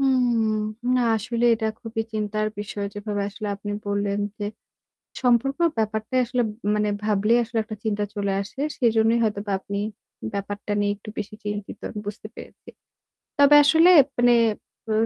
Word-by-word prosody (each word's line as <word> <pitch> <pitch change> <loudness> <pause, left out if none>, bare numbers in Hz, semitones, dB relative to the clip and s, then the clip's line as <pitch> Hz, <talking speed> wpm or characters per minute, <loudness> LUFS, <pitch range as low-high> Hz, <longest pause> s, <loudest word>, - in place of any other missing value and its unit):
হুম। 240 -5 +2 0.4
না, 255 - +3 0.2
আসলে 235 +2 -2
এটা 220 0 -2
খুবই 225 0 -3
চিন্তার 215 0 -1
বিষয় 205 0 -4
যেভাবে 205 0 -3
আসলে 210 +1 -6
আপনি 205 +1 -5
বললেন, 200 0 -1 0.2
যে, 205 - -3 0.8
সম্পর্কের 270 +7 +3
ব্যাপারটাই 220 +3 0
আসলে 245 +1 0 0.3
মানে 210 0 +1 0.2
ভাবলেই 215 +2 +3
আসলে 230 0 -3
একটা 215 -1 -7
চিন্তা 210 -1 0
চলে 200 -2 -1
আসে। 220 +7 -10 0.2
সেজন্যই 225 -1 +3
হয়তোবা 205 -1 -2
আপনি 200 +1 -5 0.5
ব্যাপারটা 205 +1 -4
নিয়ে 205 0 +1
একটু 205 - -15
বেশি 210 0 -5
চিন্তিত 205 -1 -5
আমি 210 - -7
বুঝতে 210 +1 -6
পেরেছি। - - -13 0.7
তবে 285 +1 +7
আসলে 325 +4 +6 0.3
মানে 245 0 +5 0.6
অ - - +1
215 Hz, 145 wpm, -24 LUFS, 205-235 Hz, 0.8 s, তবে